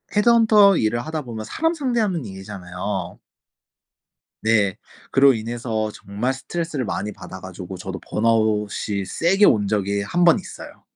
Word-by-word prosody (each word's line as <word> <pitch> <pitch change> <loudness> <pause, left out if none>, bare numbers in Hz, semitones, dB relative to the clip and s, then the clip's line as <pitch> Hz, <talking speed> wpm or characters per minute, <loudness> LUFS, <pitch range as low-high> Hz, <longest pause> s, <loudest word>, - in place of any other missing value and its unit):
헤드헌터 210 -3 +5
일을 110 +2 +1
하다 155 +3 -4
보면 110 -3 -6
사람 325 - 0
상대하는 230 - -1
일이잖아요. 95 -1 -6 1.3
네. 105 -4 +2 0.3
그로 135 -1 +5
인해서 115 -1 -3
정말 105 +6 -3
스트레스를 150 0 -4
많이 105 +1 -3
받아 95 - -10
가지고 95 0 -8
저도 95 +1 -6
번아웃이 105 -2 0
세게 185 - +2
온 105 -2 +3
적이 100 -1 0
1 175 - -2
번 170 - +6
있어요. - - -11
110 Hz, 305 characters per minute, -22 LUFS, 100-165 Hz, 1.3 s, 번